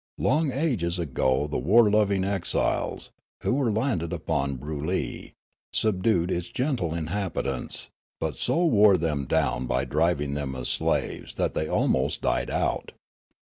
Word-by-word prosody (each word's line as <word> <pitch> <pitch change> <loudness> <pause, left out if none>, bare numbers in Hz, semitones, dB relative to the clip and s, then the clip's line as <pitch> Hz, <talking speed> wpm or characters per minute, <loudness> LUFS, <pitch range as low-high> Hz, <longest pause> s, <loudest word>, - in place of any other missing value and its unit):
Long 155 -2 +2
ages 120 - 0
ago 65 -4 +1
the 75 - -2
war 105 - +5
loving 100 -2 +2
exiles, 95 -1 -1 0.3
who - - +1
were 130 -4 +1
landed 105 - -1
upon 70 0 -1
Broolyi, 75 +6 -4 0.4
subdued 95 -4 +1
its 85 0 -2
gentle 125 - -1
inhabitants, 85 -6 -3 0.3
but - - -2
so 175 +2 +1
wore 105 - +6
them 75 -4 -1
down 65 0 0
by 65 +2 0
driving 75 0 +1
them 70 -2 -3
as 65 -1 -3
slaves - - -1
that - - 0
they 80 - -1
almost - - +1
died - - 0
out. - - -1
85 Hz, 140 wpm, -26 LUFS, 70-105 Hz, 0.4 s, wore